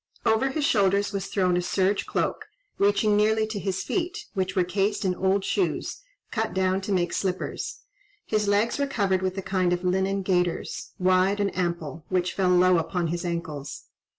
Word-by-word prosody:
Over 220 Hz, +5 st, +3 dB
his 290 Hz, +2 st, -1 dB
shoulders 200 Hz, -3 st, +2 dB
was 195 Hz, -1 st, -3 dB
thrown 185 Hz, -3 st, +1 dB
a 180 Hz, -, +1 dB
serge 190 Hz, +2 st, 0 dB
cloak, -, -, -1 dB, 0.3 s
reaching 205 Hz, +1 st, +3 dB
nearly 215 Hz, +1 st, +3 dB
to 215 Hz, -1 st, -4 dB
his 190 Hz, -1 st, -2 dB
feet, 355 Hz, -2 st, -2 dB
which 190 Hz, -2 st, -2 dB
were 185 Hz, -, +3 dB
cased 200 Hz, +3 st, 0 dB
in 185 Hz, -, +2 dB
old 190 Hz, +2 st, +1 dB
shoes, 390 Hz, +5 st, -1 dB, 0.3 s
cut 220 Hz, -3 st, -2 dB
down 190 Hz, 0 st, +1 dB
to 205 Hz, -, -4 dB
make 175 Hz, -2 st, +1 dB
slippers; 185 Hz, -2 st, -3 dB, 0.4 s
his 215 Hz, -1 st, 0 dB
legs 205 Hz, +6 st, +2 dB
were 280 Hz, -, +1 dB
covered 195 Hz, -8 st, +1 dB
with 185 Hz, 0 st, -2 dB
a 195 Hz, -, -3 dB
kind 185 Hz, -2 st, +1 dB
of 175 Hz, +1 st, -2 dB
linen 190 Hz, +2 st, +1 dB
gaiters, 180 Hz, -2 st, -1 dB
wide 185 Hz, +1 st, +3 dB
and 200 Hz, -1 st, 0 dB
ample, 170 Hz, -3 st, -3 dB
which 185 Hz, -1 st, 0 dB
fell 190 Hz, -2 st, +1 dB
low 180 Hz, -1 st, +5 dB
upon 170 Hz, +1 st, -1 dB
his 170 Hz, +1 st, -2 dB
ankles. 165 Hz, -5 st, -4 dB
190 Hz, 180 wpm, -26 LUFS, 180-205 Hz, 0.4 s, low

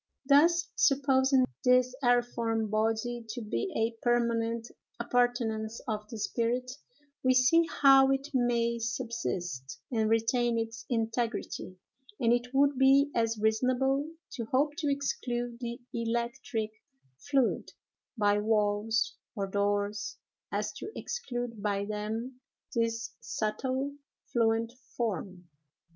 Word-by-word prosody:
Thus, 335 Hz, +5 st, +5 dB
supposing 270 Hz, -2 st, +4 dB, 0.2 s
this 250 Hz, -1 st, +4 dB
aeriform 235 Hz, -3 st, +1 dB
body 225 Hz, +2 st, 0 dB
to 240 Hz, +2 st, -4 dB
be 240 Hz, -, -2 dB
a 225 Hz, 0 st, -1 dB
permanent 235 Hz, -1 st, +1 dB, 0.3 s
appurtenance 235 Hz, -2 st, 0 dB
of 210 Hz, -2 st, -3 dB
the 225 Hz, -, -6 dB
spirit, 240 Hz, +3 st, -1 dB, 0.5 s
we 255 Hz, 0 st, +3 dB
see 325 Hz, +7 st, +5 dB, 0.2 s
how 270 Hz, -1 st, +8 dB
it 270 Hz, +1 st, 0 dB
may 235 Hz, -2 st, +1 dB
subsist 220 Hz, -, -3 dB
and 220 Hz, -3 st, +1 dB
retain 230 Hz, +1 st, +2 dB
its 230 Hz, +1 st, -4 dB
integrity; 225 Hz, -5 st, -2 dB, 0.4 s
and 235 Hz, -1 st, +4 dB
it 245 Hz, 0 st, 0 dB
would 275 Hz, 0 st, +3 dB
be 275 Hz, +2 st, +5 dB
as 230 Hz, -1 st, +1 dB
reasonable 255 Hz, +6 st, +1 dB, 0.2 s
to 235 Hz, -4 st, -4 dB
hope 280 Hz, +6 st, +1 dB
to 300 Hz, -4 st, 0 dB
exclude 245 Hz, -4 st, -2 dB
the 240 Hz, -1 st, -5 dB
electric 235 Hz, -1 st, -2 dB, 0.5 s
fluid 275 Hz, -4 st, 0 dB, 0.5 s
by 205 Hz, -1 st, +3 dB
walls 210 Hz, +1 st, +1 dB, 0.2 s
or 200 Hz, -3 st, -1 dB
doors 205 Hz, +1 st, -1 dB, 0.3 s
as 210 Hz, +1 st, -1 dB
to 425 Hz, -, -6 dB
exclude 245 Hz, -, -4 dB
by 200 Hz, -1 st, 0 dB
them 220 Hz, +5 st, -4 dB, 0.3 s
this 230 Hz, -1 st, -1 dB
subtle, 260 Hz, +6 st, -2 dB, 0.4 s
fluent 230 Hz, 0 st, +1 dB, 0.2 s
form. 190 Hz, -5 st, -3 dB
235 Hz, 115 wpm, -30 LUFS, 220-255 Hz, 0.5 s, how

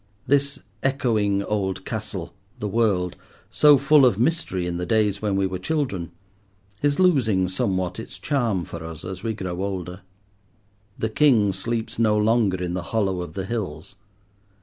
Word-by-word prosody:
This 140 Hz, +1 st, +2 dB, 0.2 s
echoing 110 Hz, -7 st, +1 dB
old 95 Hz, -3 st, -2 dB
castle, 100 Hz, -5 st, -5 dB, 0.2 s
the 105 Hz, -, -3 dB
world, 100 Hz, -5 st, +1 dB, 0.4 s
so 150 Hz, -1 st, +6 dB
full 140 Hz, +2 st, +5 dB
of 120 Hz, -7 st, +4 dB
mystery 125 Hz, -, 0 dB
in 85 Hz, -1 st, -2 dB
the 90 Hz, -, -3 dB
days 105 Hz, -1 st, +1 dB
when 105 Hz, -2 st, 0 dB
we 95 Hz, 0 st, +2 dB
were 95 Hz, -1 st, -3 dB
children, 100 Hz, -, -2 dB, 0.7 s
is 145 Hz, 0 st, +2 dB
losing 120 Hz, -, +3 dB
somewhat 95 Hz, -1 st, -1 dB
its 115 Hz, -, -7 dB
charm 115 Hz, -, 0 dB
for 85 Hz, -1 st, -8 dB
us 80 Hz, 0 st, -8 dB
as 95 Hz, 0 st, -6 dB
we 110 Hz, 0 st, -2 dB
grow 90 Hz, -2 st, -4 dB
older. 95 Hz, -1 st, -4 dB, 1.0 s
The 110 Hz, -, -1 dB
king 110 Hz, -6 st, +4 dB
sleeps 115 Hz, +4 st, -3 dB
no 110 Hz, -2 st, +3 dB
longer 105 Hz, -4 st, +2 dB
in 90 Hz, -1 st, -2 dB
the 90 Hz, -, -2 dB, 0.2 s
hollow 95 Hz, -4 st, +1 dB
of 90 Hz, -, -7 dB
the 95 Hz, -1 st, -3 dB
hills. 95 Hz, -7 st, -5 dB
100 Hz, 160 wpm, -24 LUFS, 95-120 Hz, 1.0 s, so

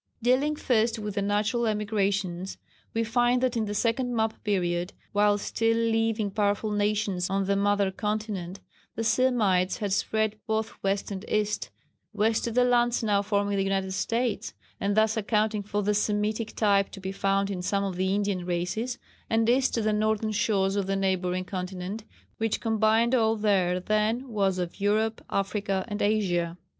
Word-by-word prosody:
Dealing 265 Hz, +5 st, +3 dB
first 230 Hz, -4 st, +1 dB
with 210 Hz, -1 st, -4 dB
the 200 Hz, -, -1 dB
natural 210 Hz, +4 st, +1 dB
emigrations 200 Hz, -4 st, -1 dB, 0.3 s
we 230 Hz, -, 0 dB
find 240 Hz, +2 st, +2 dB
that 255 Hz, -1 st, 0 dB
in 225 Hz, -2 st, 0 dB
the 205 Hz, 0 st, -4 dB
second 240 Hz, +3 st, 0 dB
map 220 Hz, -1 st, -1 dB
period 180 Hz, -3 st, -1 dB, 0.2 s
while 205 Hz, 0 st, +3 dB
still 225 Hz, +2 st, 0 dB
leaving 225 Hz, -2 st, +1 dB
powerful 205 Hz, +1 st, 0 dB
nations 205 Hz, -3 st, 0 dB
on 195 Hz, 0 st, 0 dB
the 200 Hz, +1 st, +1 dB
mother 200 Hz, -1 st, +2 dB
continent, 210 Hz, -3 st, -3 dB, 0.4 s
the 225 Hz, -, -2 dB
Semites 220 Hz, -7 st, +2 dB
had 205 Hz, -2 st, -2 dB
spread 220 Hz, +1 st, 0 dB
both 220 Hz, 0 st, -1 dB
west 195 Hz, +1 st, -1 dB
and 195 Hz, 0 st, -5 dB
east 210 Hz, 0 st, 0 dB, 0.4 s
west 220 Hz, +1 st, +1 dB
to 235 Hz, -, -2 dB
the 250 Hz, +2 st, +3 dB
lands 240 Hz, -1 st, +2 dB
now 205 Hz, -2 st, +2 dB
forming 205 Hz, 0 st, 0 dB
the 195 Hz, -, +2 dB
United 195 Hz, -1 st, -1 dB
States, 230 Hz, +4 st, -1 dB, 0.2 s
and 200 Hz, +1 st, 0 dB
thus 220 Hz, 0 st, +3 dB
accounting 215 Hz, 0 st, +1 dB
for 205 Hz, +1 st, -2 dB
the 210 Hz, +1 st, +2 dB
Semitic 210 Hz, +1 st, -1 dB
type 200 Hz, -2 st, +3 dB
to -, -, -10 dB
be 190 Hz, 0 st, -4 dB
found 195 Hz, 0 st, 0 dB
in 185 Hz, -2 st, -3 dB
some 200 Hz, +2 st, 0 dB
of 195 Hz, -2 st, -3 dB
the 190 Hz, +2 st, 0 dB
Indian 200 Hz, -3 st, -1 dB
races, 180 Hz, +8 st, -2 dB, 0.3 s
and 225 Hz, 0 st, +2 dB
east 255 Hz, +2 st, +3 dB
to 230 Hz, -, 0 dB
the 215 Hz, 0 st, +1 dB
northern 215 Hz, +1 st, +1 dB
shores 195 Hz, -2 st, +1 dB
of 200 Hz, -2 st, -1 dB
the 195 Hz, -, 0 dB
neighbouring 185 Hz, -1 st, 0 dB
continent, 185 Hz, +3 st, -5 dB, 0.3 s
which 225 Hz, -1 st, 0 dB
combined 225 Hz, +1 st, +2 dB
all 225 Hz, -3 st, +3 dB
there 190 Hz, -4 st, +2 dB
then 215 Hz, +6 st, 0 dB
was 195 Hz, -4 st, +1 dB
of 180 Hz, +2 st, -4 dB
Europe, 220 Hz, +2 st, +1 dB
Africa 195 Hz, -1 st, -1 dB
and 205 Hz, -2 st, -4 dB
Asia. 180 Hz, -5 st, +1 dB
210 Hz, 170 wpm, -27 LUFS, 195-220 Hz, 0.4 s, Dealing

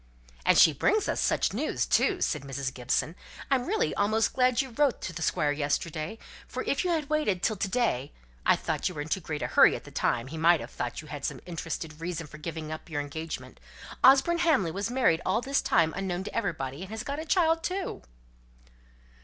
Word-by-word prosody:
"And -, -, +6 dB
she 160 Hz, -, +7 dB
brings 415 Hz, -, +1 dB
us -, -, -1 dB
such -, -, +1 dB
news -, -, -1 dB
too!" 380 Hz, -3 st, +2 dB
said 150 Hz, -, 0 dB
Mrs. 135 Hz, -1 st, -4 dB
Gibson. 135 Hz, +6 st, -1 dB, 0.4 s
"I'm 255 Hz, -2 st, +2 dB
really 435 Hz, +4 st, +1 dB
almost 215 Hz, +2 st, +1 dB
glad 250 Hz, -2 st, +3 dB
you 265 Hz, -2 st, 0 dB
wrote 275 Hz, +2 st, +1 dB
to 175 Hz, -, -5 dB
the 165 Hz, -, -6 dB
Squire 150 Hz, -2 st, +1 dB
yesterday, 155 Hz, +5 st, -2 dB, 0.3 s
for -, -, -4 dB
if -, -, 0 dB
you 365 Hz, -, 0 dB
had 315 Hz, -4 st, 0 dB
waited 295 Hz, -13 st, 0 dB
till 220 Hz, -, +2 dB
to 195 Hz, -, -1 dB
day 190 Hz, -, 0 dB, 0.3 s
I -, -, +5 dB
thought -, -, -2 dB
you 180 Hz, -, -9 dB
were 145 Hz, -, -3 dB
in 155 Hz, -, -10 dB
too 190 Hz, -, 0 dB
great 155 Hz, -3 st, -4 dB
a -, -, 0 dB
hurry -, -, +5 dB
at -, -, -7 dB
the -, -, -12 dB
time 115 Hz, -1 st, 0 dB
he 155 Hz, +4 st, -7 dB
might 170 Hz, +1 st, +5 dB
have -, -, -8 dB
thought 120 Hz, +5 st, -4 dB
you -, -, -13 dB
had 145 Hz, -2 st, -7 dB
some -, -, -3 dB
interested 165 Hz, -2 st, -5 dB
reason 170 Hz, -1 st, -3 dB
for 150 Hz, +1 st, -12 dB
giving 155 Hz, -1 st, -5 dB
up 155 Hz, +2 st, -7 dB
your 155 Hz, -3 st, -2 dB
engagement. 160 Hz, +3 st, -6 dB, 0.4 s
Osborne 275 Hz, +6 st, +6 dB
Hamley 300 Hz, -, +3 dB
was 200 Hz, +6 st, -3 dB
married 240 Hz, -10 st, +2 dB
all 190 Hz, +4 st, +1 dB
this 275 Hz, +3 st, 0 dB
time 160 Hz, -1 st, +2 dB
unknown 190 Hz, -1 st, -2 dB
to -, -, -7 dB
everybody, 155 Hz, -, -2 dB
and 190 Hz, -, -7 dB
has 220 Hz, +1 st, -5 dB
got 280 Hz, +3 st, -4 dB
a -, -, -3 dB
child 330 Hz, -1 st, +3 dB
too." 365 Hz, +2 st, -3 dB
180 Hz, 220 wpm, -28 LUFS, -, 0.4 s, she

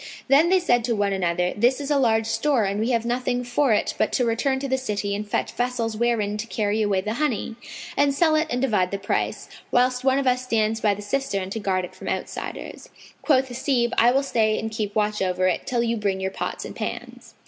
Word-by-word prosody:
[FN#510] -, -, -12 dB
Then 340 Hz, +7 st, +5 dB
said 245 Hz, -8 st, +3 dB
they -, -, -8 dB
to 235 Hz, -2 st, 0 dB
one 205 Hz, -1 st, 0 dB
another, 180 Hz, -1 st, 0 dB
"This 245 Hz, +5 st, +2 dB
is 285 Hz, 0 st, -4 dB
a 285 Hz, -, +3 dB
large 225 Hz, -3 st, +2 dB
store 265 Hz, +1 st, +1 dB
and 200 Hz, +1 st, -1 dB
we 225 Hz, +3 st, 0 dB
have 235 Hz, -2 st, +1 dB
nothing 245 Hz, +1 st, -1 dB
for 245 Hz, +2 st, +1 dB
it 210 Hz, -, +1 dB
but -, -, +2 dB
to 250 Hz, -, +2 dB
return 240 Hz, +4 st, +1 dB
to 275 Hz, +1 st, -3 dB
the 265 Hz, -, +1 dB
city 205 Hz, -5 st, -2 dB
and 205 Hz, +1 st, -4 dB
fetch -, -, -1 dB
vessels 245 Hz, -2 st, -2 dB
wherein 215 Hz, -3 st, 0 dB
to 220 Hz, +2 st, -5 dB
carry 215 Hz, -1 st, -1 dB
away 200 Hz, -3 st, +1 dB
the 215 Hz, +3 st, -3 dB
honey, 235 Hz, -6 st, -1 dB, 0.4 s
and 285 Hz, 0 st, +3 dB
sell 315 Hz, +3 st, +2 dB
it 310 Hz, +1 st, +2 dB
and 250 Hz, +2 st, -1 dB
divide 210 Hz, -8 st, +2 dB
the 200 Hz, -, -3 dB
price, 200 Hz, +1 st, -2 dB, 0.2 s
whilst 250 Hz, +1 st, +2 dB
one 265 Hz, 0 st, +3 dB
of 275 Hz, -, 0 dB
us 250 Hz, 0 st, +2 dB
stands 220 Hz, -2 st, 0 dB
by 205 Hz, -2 st, +2 dB
the 205 Hz, -, -8 dB
cistern, 205 Hz, -5 st, -2 dB
to 225 Hz, -, -3 dB
guard 185 Hz, -3 st, 0 dB
it -, -, -13 dB
from -, -, -10 dB
outsiders." -, -, -5 dB, 0.3 s
Quoth 265 Hz, -3 st, +2 dB
Hasib, 245 Hz, -1 st, 0 dB
"I 235 Hz, -, +5 dB
will 270 Hz, +3 st, +2 dB
stay 220 Hz, -5 st, +1 dB
and 220 Hz, 0 st, -3 dB
keep 215 Hz, -2 st, -3 dB
watch 210 Hz, -1 st, 0 dB
over 185 Hz, -1 st, 0 dB
it 185 Hz, -2 st, 0 dB
till 240 Hz, -2 st, +1 dB
you 235 Hz, 0 st, 0 dB
bring 200 Hz, -3 st, -1 dB
your 190 Hz, 0 st, -2 dB
pots -, -, -4 dB
and -, -, -8 dB
pans." -, -, -6 dB
230 Hz, 240 wpm, -24 LUFS, 205-255 Hz, 0.4 s, Then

